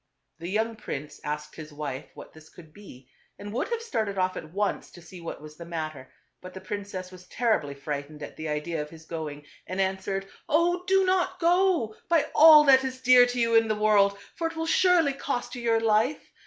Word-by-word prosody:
The 170 - -6
young 220 +3 -1
prince 150 -9 -7
asked 150 0 -5
his 155 -1 -9
wife 145 -2 -6
what - - -12
this 160 0 -16
could 160 -3 -16
be, 135 -11 -14 0.3
and 205 +1 -8
would 245 - -1
have 470 -1 -3
started 220 - -2
off 185 0 0
at 155 - -8
once 200 +2 -2
to - - -14
see 175 +1 -12
what 165 -2 -7
was 155 0 -12
the 170 - -8
matter; 155 -5 -6 0.3
but 185 0 -11
the - - -6
princess 195 -2 -6
was 180 -1 -14
terribly 215 -13 0
frightened 145 +1 -6
at - - -9
the 155 - -6
idea 150 +2 -2
of 150 - -7
his 160 0 -14
going, 150 -3 -6 0.2
and 185 +1 -5
answered, 195 0 -2
" - - -36
Oh! 350 +3 +2
do 385 0 +4
not 370 -1 0
go, 345 - +2 0.2
by 330 -3 +3
all 305 -1 +9
that 265 -2 +6
is 260 -1 -4
dear 250 -1 +6
to 245 0 -3
you 230 -1 +1
in 225 0 +5
the 215 - 0
world, 205 -2 +3 0.2
for 330 - -2
it 330 - -8
will 325 0 -2
surely 335 -3 +3
cost 270 -2 -4
you 245 - -6
your 230 -1 +2
life. 225 +5 +1
200 Hz, 220 wpm, -26 LUFS, 160-255 Hz, 0.3 s, all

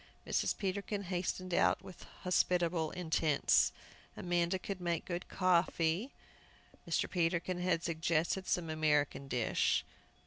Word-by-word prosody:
Mrs. - - 0
Peterkin 200 +1 -2
hastened 180 0 -3
out - - +3
with 185 - -11 0.2
hospitable 175 -3 +1
intents. 160 -4 +2 0.5
Amanda 175 +1 0
could 185 0 -6
make 170 -2 -1
good 175 -1 -4
coffee. 180 - +1 0.8
Mr. - - +1
Peterkin 175 0 0
had 180 -2 +1
suggested 165 +3 0
some 165 -3 0
American 150 -3 +1
dish. 125 -3 +1
175 Hz, 110 wpm, -34 LUFS, 160-185 Hz, 0.8 s, out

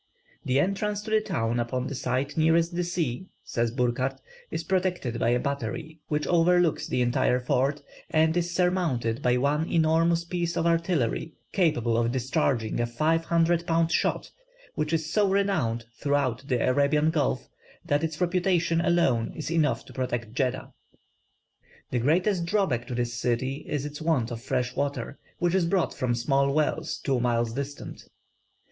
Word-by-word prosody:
"The 130 +2 +1
entrance 200 +4 -1
to 215 - -7
the 220 0 +4
town, 115 - -1
upon 125 +2 -2
the 140 - -4
side 130 +1 -2
nearest 165 +2 +3
the 175 - 0
sea," 175 -2 -2 0.2
says 115 -1 -1
Burckhardt, 125 +2 -1 0.3
"is 165 - -3
protected 180 -10 -1
by 115 - +2
a 120 +1 +2
battery 140 +5 -4
which 150 0 -1
overlooks 175 -1 +3
the 125 - +1
entire 125 0 +2
fort, 135 +3 0 0.3
and 160 +1 +3
is 175 0 0
surmounted 170 -10 0
by 125 -1 +2
one 145 +5 +1
enormous 165 +1 +3
piece 170 -1 -2
of 165 - 0
artillery 165 -4 0 0.2
capable 135 - +1
of 120 0 +1
discharging 130 -3 0
a 120 - +1
five 160 +7 +1
hundred 170 0 +2
pound 165 0 +2
shot, - - 0 0.4
which 150 0 -2
is 160 -1 -1
so 205 -2 +3
renowned 175 - 0
throughout 140 -3 0
the 125 -4 +1
Arabian 145 +4 +3
Gulf, 150 -4 0 0.4
that 145 +2 +1
its 160 -2 -3
reputation 175 -2 +1
alone 170 -10 +2
is 155 0 -5
enough 160 -3 +1
to - - -13
protect 120 -4 -3
Jeddah." 130 0 -2 1.2
The 125 - +1
greatest 170 - +2
drawback 170 - 0
to 125 - -4
this 120 0 -1
city 125 +4 -2
is 145 -1 -2
its 150 +1 -7
want 145 -8 +1
of 115 -1 -5
fresh 125 +1 -2
water, 140 -2 -3 0.2
which 175 0 +1
is 185 -3 +2
brought 185 0 +1
from 125 -2 -1
small 140 +3 +1
wells 150 +1 0
two 135 -2 0
miles 120 -1 0
distant. 140 +2 -6
145 Hz, 165 wpm, -27 LUFS, 125-170 Hz, 1.2 s, the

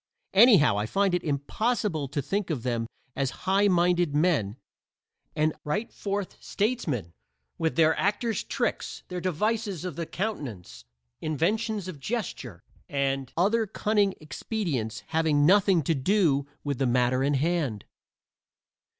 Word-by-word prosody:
Anyhow 195 - +6
I 105 - -1
find 195 - +1
it 180 - 0
impossible 160 - -1
to 140 +1 -3
think 195 +6 -2
of 140 -8 -2
them 120 -2 -1 0.3
as 135 -1 -3
highminded 180 -5 +3
men 150 - +1 0.8
and 155 0 +2
right 205 +10 -2
forth 200 -1 -4
statesmen 165 - -2 0.5
with 160 - 0
their 160 -1 +4
actors' 215 +3 0
tricks, - - -3
their 180 -1 -4
devices 200 +1 -1
of 175 -6 -5
the 170 -2 -3
countenance, 120 - -5 0.4
inventions 200 - -1
of 170 -6 -7
gesture 220 - -4 0.3
and 135 -2 -1
other 215 +5 +2
cunning 205 -1 +1
expedients 155 - -3
having 155 -3 +2
nothing 190 -1 +4
to 165 - +1
do 145 -2 +2 0.2
with 140 -3 -2
the 135 - +2
matter 125 +1 +2
in 140 +1 +2
hand. 145 - -1
165 Hz, 130 wpm, -27 LUFS, 140-200 Hz, 0.8 s, Anyhow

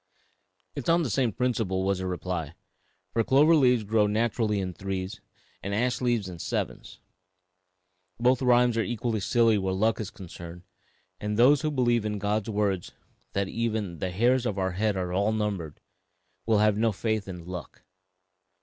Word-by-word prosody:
"It - - -6
is - - -1
on 170 +1 +4
the 130 - -2
same 125 -2 +1
principle," 110 -5 -1
was 95 -1 0
the 95 - -3
reply, 90 -3 -4 0.6
"for 115 - +2
clover 150 +7 +5
leaves 125 -6 +4
grow 105 0 +2
naturally 110 0 0
in 90 -2 -3
threes 95 +2 -5 0.4
and 100 +1 -3
ash 125 +3 0
leaves 120 -5 +1
in 90 -2 -8
sevens. - - -4 1.2
Both 125 +2 +3
rhymes 125 -2 +4
are - - +3
equally 115 -1 -2
silly 115 +1 +3
where 95 -1 -1
luck 110 +3 +1
is 105 -4 -4
concerned, 85 -2 -10 0.6
and 105 0 -3
those 130 +4 +6
who 155 - 0
believe 120 -6 +1
God's 105 +1 -1
words 100 -4 -1 0.4
that 100 0 0
even 110 -6 -2
'the 95 - -2
hairs 120 +7 +2
of 100 - -3
our 95 -1 0
head 105 +2 0
are 90 -1 -2
all 100 +3 +2
numbered' 100 -8 -3 0.7
will 110 -2 +4
have 105 0 +3
no 115 0 +3
faith 110 0 -2
in 90 -3 -8
'luck.' 90 -3 -8
105 Hz, 170 wpm, -27 LUFS, 95-120 Hz, 1.2 s, those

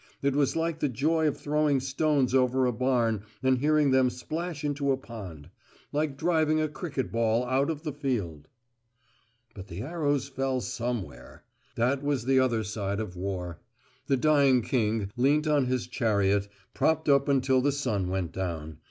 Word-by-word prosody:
It 140 -1 +1
was 140 -2 +2
like 165 0 -1
the 145 - +1
joy 155 +6 +1
of 150 - -1
throwing 150 -1 +1
stones 135 -1 +1
over 130 0 +3
a 125 - +2
barn 115 -3 +1 0.2
and 130 -1 +3
hearing 150 0 +3
them 130 -1 +4
splash 155 +5 -5
into 145 -1 0
a 135 - +1
pond; 95 - -10 0.4
like 145 -2 -1
driving 155 -1 +2
a 155 - +1
cricket 145 - -4
ball 115 +1 +1
out 130 +3 +1
of 155 -1 -4
the 150 -3 -3
field. 105 - -3 1.1
But 95 -1 -10
the 90 +4 -6
arrows 145 -3 -1
fell 135 -1 -1
somewhere. 100 - -5 0.3
That 130 +4 +1
was 140 -5 -1
the 130 0 +4
other 120 -4 +1
side 100 -1 -3
of 105 -5 -5
war. 90 -3 -4 0.5
The 135 - +2
dying 140 -3 +4
king 110 -5 0
leant 145 +5 +3
on 145 -4 +2
his 125 -1 -1
chariot, 100 -4 +1 0.3
propped 160 0 +1
up 140 0 +4
until 130 -1 +3
the 145 +2 +2
sun 115 -10 -1
went 95 -2 -2
down. 80 -5 -5
130 Hz, 170 wpm, -28 LUFS, 110-145 Hz, 1.1 s, them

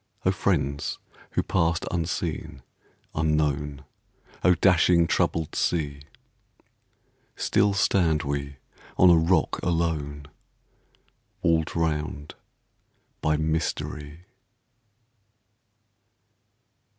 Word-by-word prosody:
O - - +4
friends 70 +2 -1 0.4
who - - +1
passed 85 -2 0
unseen, 80 -5 -3 0.5
unknown! 75 -2 0 0.6
O 90 -1 +5
dashing, 85 -1 +4
troubled 80 -1 0
sea! 70 -4 -1 1.3
Still 100 0 +2
stand 85 -5 +2
we 70 0 -3 0.4
on 90 -1 +7
a - - +7
rock 80 0 +2
alone, 80 -4 -1 1.2
Walled 80 -2 +1
round 75 -2 -2 0.9
by 75 0 +2
mystery. 80 0 -3
80 Hz, 75 wpm, -26 LUFS, 75-85 Hz, 1.3 s, on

